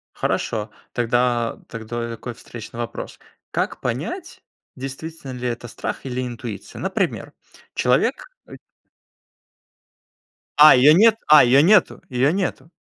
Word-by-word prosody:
Хорошо, 105 -1 -2 0.2
тогда 120 0 0
тогда, 115 +1 -5
такой 120 +1 -7
встречный 115 0 -11
вопрос: 120 -1 -6 0.3
как - - -2
понять, - - -5 0.3
действительно 135 +2 -7
ли 125 0 -4
это 120 0 -5
страх 120 - -6
или 125 0 -3
интуиция? 120 -4 -7
Например: - - -2 0.4
человек 130 - +1 0.2
ы - - -11 2.0
А, 150 -1 +10
её 135 +4 +7
нет. 215 +6 +5
А, 150 -2 +8
её 130 +3 +5
нету 200 +8 +4
её 130 +3 +2
нету. 190 -3 -3
125 Hz, 115 wpm, -21 LUFS, 120-150 Hz, 2.0 s, А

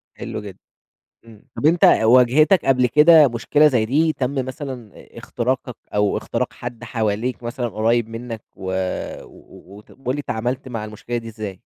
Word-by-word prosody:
حلو - - -6
جدًا 100 -3 -10 0.7
امم، 115 +2 -17
طب - - -2
أنت 165 +2 +5
واجهتك 130 - +5
قبل 130 -2 +3
كده 150 +3 +7
مشكلة 140 +5 +3
زي 125 -6 +1
دي، 155 +7 +2
تم 135 -1 -2
مثلًا 130 -5 -7
إ - - -16
اختراقك 125 0 -3 0.2
أو 105 -1 +1
اختراق - - -3
حد 120 -1 -8
حواليك 115 +1 -2
مثلًا 120 +1 -3
قريّب 115 +2 +1
منك 115 -1 -7
و 95 0 -5 0.5
و 100 +2 -16
وت 105 - -17
قُل 130 0 -4
لي 145 - -3
تعاملت 125 +2 -3
مع 115 -4 -5
المشكلة 110 +3 -5
دي 115 -1 -7
إزاي؟ 105 -4 -7
120 Hz, 165 wpm, -21 LUFS, 110-135 Hz, 0.7 s, كده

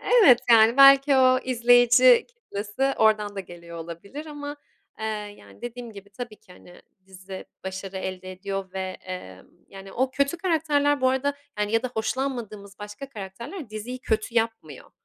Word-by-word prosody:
evet, 390 - +6
yani, 225 +1 +6
belki, 275 0 +7
o 255 0 +5
izleyici 245 0 +5
kitlesi 270 - -3
oradan 210 -2 +2
da - - -2
geliyor 170 -2 -11
olabilir 170 - -8
ama, 290 -1 -7 0.4
eee, 220 - -3 0.3
yani, - - -18
dediğim 240 -1 -7
gibi 200 0 -13
tabii 230 0 -8
ki, 180 - -19
hani, 175 0 -17 0.2
dizi 190 0 -10 0.2
başarı 190 0 -6
elde 185 0 -5
ediyor 190 0 -5
ve, 190 - -4 0.2
emm, 95 - -9 0.2
yani, 195 0 -11
o 260 +2 0
kötü 280 +5 0
karakterler, 295 -5 +1
bu 260 - +4
arada, 270 +2 0 0.3
ya 225 +2 +1
da 255 - -2
hoşlanmadığımız 220 -4 -4
başka 210 +6 -8
karakterler 235 - -8
diziyi 230 +4 -6
kötü 220 -1 -2
yapmıyor. 225 - -2
225 Hz, 150 wpm, -25 LUFS, 195-265 Hz, 0.4 s, belki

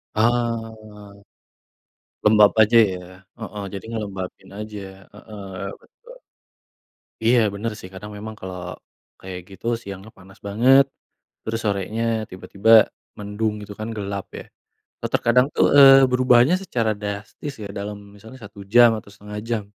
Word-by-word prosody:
Ah. 110 -3 -2 1.1
Lembab 105 -1 +6
aja 115 +2 +5
ya? 90 - -5 0.4
Heeh, 105 -2 -6
jadi 100 +2 -7
ngelembabin 100 -4 -6
aja. 105 -1 -7 0.3
Heeh, 105 -1 -11 0.3
betul. - - -18 1.1
Iya 120 +2 +5 0.2
benar 110 +2 -3
sih, 90 - -10
karena 105 +3 -9
memang 110 +1 -7
kalau 95 -1 -7 0.6
kayak 95 -1 -7
gitu, 95 +4 -12
siangnya 100 0 -9
panas 95 +1 -17
banget, 130 +6 +5 0.6
terus 115 0 -3
sorenya 105 +2 -2 0.3
tiba-tiba 100 +3 -2 0.5
mendung 105 +1 -2
gitu, 100 0 -9
kan 110 - -4
gelap 100 -1 -4
ya. - - -9 0.6
Atau - - -3
terkadang 125 +3 +3
tuh, - - +4
eee, 135 -1 +9
berubahnya 125 +5 +4
secara 115 - -1
drastis 105 +8 -6
ya, - - -5
dalam 105 0 -5 0.2
misalnya 110 +6 -13
1 100 0 -12
jam 120 -1 +8
atau 100 - -11
1/2 105 0 -10
jam, 110 -3 -1
105 Hz, 135 wpm, -22 LUFS, 100-115 Hz, 1.1 s, eee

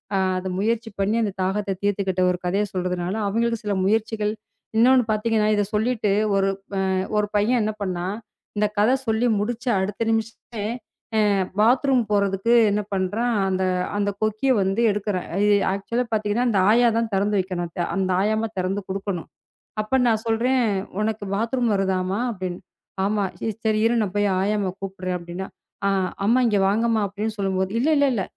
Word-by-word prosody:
ஆ - - +3 0.2
அது 185 +1 -3
முயற்சி 225 +2 0
பண்ணி 200 +3 +1
அந்தத் 205 -3 -2
தாகத்த 195 +1 -1
தீர்த்துகிட்ட 195 -2 0
ஒரு 180 - -2
கதையச் 195 +3 0
சொல்றதுனால 180 0 -2
அவங்களுக்கு 230 +2 0
சில 205 -1 -1
முயற்சிகள் 215 0 0 0.4
இன்னொன்னு 250 +2 +6
பாத்தீங்கன்னா 215 0 +1
இத 205 - +2
சொல்லிட்டு, 220 -1 +1 0.2
ஒரு 195 0 +2 0.7
ஒரு 210 0 +2
பையன் 220 +4 +3
என்ன 215 0 0
பண்ணான். 185 +1 -2 0.4
இந்தக் 210 0 0
கத 225 +6 +4
சொல்லி 220 +2 +2
முடிச்சு 240 +4 -2
அடுத்த 200 +4 -2
நிமிஷமே 225 -1 -3 0.5
அ - - +4 0.4
பாத்ரூம் 250 +3 +4
போறதுக்கு 200 +2 +2 0.2
என்ன 210 +1 +1
பண்றான் 210 +5 0
அந்த 190 0 0 0.3
அந்தக் 205 -1 -1
கொக்கிய 215 +5 +1
வந்து 195 +4 0
எடுக்கிறான். 200 -2 -2
அ - - +1 0.3
ஆக்சுவல 230 +5 -1
பாத்தீங்கன்னா 215 +3 +1
அந்த 205 -4 +2
ஆயா 240 +1 +5
தான் 230 -1 -1
தெறந்து 205 +1 +1
வைக்கணும். 175 -2 -4 0.3
அந்த 190 -1 0
ஆயாமா 215 +2 +1
தெறந்து 190 +2 -1
குடுக்கணும். 195 -2 -4 0.5
அப்ப 240 +5 +1
நான் 220 -1 +1
சொல்றேன் 245 +3 +2 0.4
உனக்கு 215 -1 -1
பாத்ரூம் 235 +2 0
வருதாமா 190 0 0
அப்டின்னு. 185 -3 -5 0.4
ஆமா 205 0 +1 0.2
ச 225 - -1
சரி 215 -1 +2
இரு 230 - +3
நான் 205 -3 -1
போயி 205 0 +2 0.2
ஆயாமா 205 -1 0
கூப்பிடுறேன் 190 -1 -4
அப்டின்னா, 175 +2 -6 0.4
அ - - +3 0.4
அம்மா 235 +5 +4
இங்க 210 -3 +2
வாங்கம்மா 225 +2 +2
அப்டின்னு 210 +2 -4
சொல்லம்போது, 190 -1 0
இல்ல 275 +6 +2 0.2
இல்ல 215 -6 0
210 Hz, 155 wpm, -23 LUFS, 195-225 Hz, 0.7 s, இன்னொன்னு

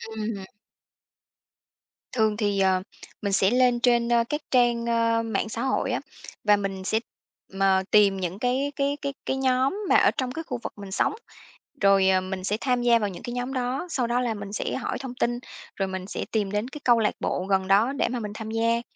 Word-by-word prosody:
Ừm. 215 -2 -3 1.7
Thường 220 -3 +1
thì, 205 -3 0
ờ, 190 -1 +3 0.4
mình 200 -1 -1
sẽ 195 0 +4
lên 250 -1 +3
trên, 240 -1 +3
ơ, 235 -1 +4
các 295 +1 -2
trang, 240 -2 +3
ơ, 230 -1 +2
mạng 220 -1 -2
xã 230 - -4
hội 265 - 0
á, - - -1 0.4
và 210 -1 +5
mình 195 -2 -3
sẽ, 220 +4 +1 0.6
ờ, 190 -1 +4
tìm 200 -2 +5
những 185 +1 -4
cái 260 +4 0
cái 280 +1 0
cái 280 -1 -3
cái 265 - -1
nhóm 265 +5 +1
mà - - +5
ở - - +5
trong 255 -1 -3
cái 325 +5 -5
khu 250 - -3
vực - - -5
mình 200 -1 -9
sống, - - +1 0.7
rồi, 195 -1 +5
ờ, 185 -1 +3
mình 185 0 -5
sẽ 205 +3 0
tham 250 -2 +1
gia 235 -1 +4
vào 205 -2 -1
những 180 - -9
cái 240 - -5
nhóm 245 +2 -3
đó. 255 +6 -2
Sau 255 -7 0
đó 240 +1 +1
là 240 -2 0
mình 200 -1 -7
sẽ - - -2
hỏi 255 - -3
thông 260 -2 -6
tin, 240 -1 0 0.4
rồi 195 -1 -1
mình 190 0 -5
sẽ - - -4
tìm 205 -3 0
đến 210 +3 -1
cái 295 +1 -9
câu 240 -2 +5
lạc 210 - +1
bộ 185 - -2
gần 190 -1 +2
đó 210 +7 +4
để 280 - 0
mà 245 - -2
mình 210 -2 -5
tham 220 -1 -6
gia. 230 +1 +1
230 Hz, 220 wpm, -25 LUFS, 200-250 Hz, 1.7 s, và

